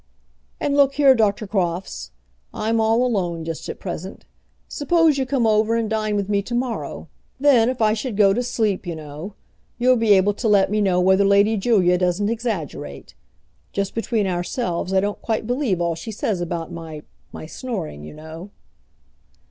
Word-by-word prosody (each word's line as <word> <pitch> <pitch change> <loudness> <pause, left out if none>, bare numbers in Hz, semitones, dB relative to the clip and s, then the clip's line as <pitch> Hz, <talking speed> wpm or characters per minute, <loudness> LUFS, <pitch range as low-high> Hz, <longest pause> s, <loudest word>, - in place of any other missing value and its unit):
"And 285 - 0
look 275 -1 +4
here, 280 -2 +6
Doctor 215 -3 +1
Crofts, 175 - -2 0.5
I'm 225 +1 0
all 225 +3 +3
alone 175 -8 -1
just 165 -1 -5
at - - -6
present. 185 +1 -7 0.4
Suppose 315 0 +2
you 265 - -1
come 260 -3 +1
over 220 +1 +3
and 230 -1 0
dine 215 -1 -1
with 200 -2 -1
me 200 -1 +1
to 240 +4 -5
morrow; 245 -1 -3 0.3
then, 255 -5 +5
if 255 -3 -1
I 215 0 +4
should 225 -1 -4
go 200 -2 +5
to 245 - 0
sleep, 215 -6 -1
you 170 - -3
know, 155 +6 -8 0.4
you'll 250 +1 +4
be 225 -2 +4
able 195 +1 +4
to 225 +3 -3
let 200 -2 +4
me 210 0 +1
know 185 -3 +2
whether 190 +2 +4
Lady 200 +2 +4
Julia 190 -4 +3
doesn't 180 +3 +1
exaggerate. 175 - -4 0.6
Just 200 -1 -2
between 225 -2 -1
ourselves, 180 0 -2
I 190 0 +3
don't 205 +1 -3
quite 220 -1 -2
believe 245 - 0
all 170 -1 0
she 165 +7 -7
says 205 -3 -2
about 170 -1 -4
my 160 -3 -8 0.3
my - - -8
snoring, 170 - -6
you 75 - -10
know." 160 +5 -10
205 Hz, 180 wpm, -22 LUFS, 180-230 Hz, 0.6 s, here